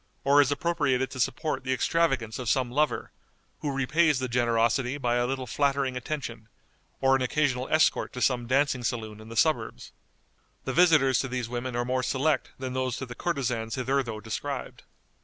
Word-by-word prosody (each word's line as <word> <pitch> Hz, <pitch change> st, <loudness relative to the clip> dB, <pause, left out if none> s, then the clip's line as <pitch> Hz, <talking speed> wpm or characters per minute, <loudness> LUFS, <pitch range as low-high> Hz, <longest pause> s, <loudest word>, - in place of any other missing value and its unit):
or 140 Hz, +1 st, +6 dB
is 140 Hz, -1 st, +1 dB
appropriated 145 Hz, -4 st, 0 dB
to 130 Hz, -, -7 dB
support 150 Hz, +4 st, -1 dB
the 130 Hz, -, -2 dB
extravagance 130 Hz, -4 st, 0 dB
of 125 Hz, -4 st, -3 dB
some 125 Hz, -1 st, +1 dB
lover, 150 Hz, +4 st, 0 dB, 0.5 s
who 150 Hz, -2 st, -2 dB
repays 150 Hz, +3 st, +2 dB
the 130 Hz, 0 st, -2 dB
generosity 120 Hz, +2 st, +1 dB
by 120 Hz, -3 st, 0 dB
a 120 Hz, 0 st, +1 dB
little 130 Hz, 0 st, -3 dB
flattering 140 Hz, 0 st, 0 dB
attention, 120 Hz, -4 st, -5 dB, 0.5 s
or 135 Hz, 0 st, +4 dB
an 135 Hz, -, 0 dB
occasional 130 Hz, -1 st, 0 dB
escort 155 Hz, 0 st, +2 dB
to 125 Hz, -, -7 dB
some 125 Hz, -2 st, +1 dB
dancing 130 Hz, -1 st, +1 dB
saloon 110 Hz, -3 st, -3 dB
in 110 Hz, -, -12 dB
the 115 Hz, -, -7 dB
suburbs. 125 Hz, -7 st, 0 dB, 0.7 s
The 130 Hz, -, -3 dB
visitors 150 Hz, -7 st, +5 dB
to 130 Hz, -, -1 dB
these 125 Hz, -2 st, -3 dB
women 120 Hz, 0 st, -4 dB
are 120 Hz, 0 st, 0 dB
more 130 Hz, +1 st, 0 dB
select 135 Hz, +2 st, 0 dB
than 130 Hz, -1 st, -5 dB
those 130 Hz, -1 st, -1 dB
to 130 Hz, -, -4 dB
the 120 Hz, -, -8 dB
courtesans 125 Hz, -8 st, -2 dB
hitherto 130 Hz, -3 st, -1 dB
described. 125 Hz, +5 st, -5 dB
130 Hz, 175 wpm, -27 LUFS, 120-140 Hz, 0.7 s, or